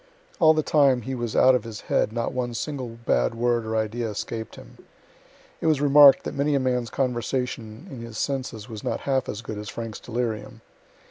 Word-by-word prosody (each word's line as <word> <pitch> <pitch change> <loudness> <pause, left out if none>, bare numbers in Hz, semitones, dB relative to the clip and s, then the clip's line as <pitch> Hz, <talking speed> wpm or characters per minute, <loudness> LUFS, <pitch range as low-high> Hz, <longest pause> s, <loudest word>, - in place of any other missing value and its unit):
All 160 -2 +6
the 155 - +1
time 140 -6 +3
he 130 - -4
was 120 -3 -3
out 130 - +6
of 125 - +1
his 115 -2 -8
head - - 0
not 115 0 -2
one 120 -2 -3
single 130 -5 -4
bad - - +1
word 120 -1 0
or 110 0 -1
idea 110 +1 -2
escaped 110 +2 -5
him. - - -14 0.8
It - - 0
was 155 -3 +3
remark'd 145 -1 +7
that - - -5
many 145 +1 +1
a - - +3
man's 125 -2 0
conversation 125 - -3
in 130 -9 -9
his 115 -2 -8
senses 130 -6 -3
was 110 -2 -8
not - - -2
half 135 -1 0
as 105 +2 -5
good 105 -1 -6
as 105 0 -7
Frank's 115 -2 -6
delirium. 115 -2 -4
120 Hz, 200 wpm, -25 LUFS, 110-135 Hz, 0.8 s, remark'd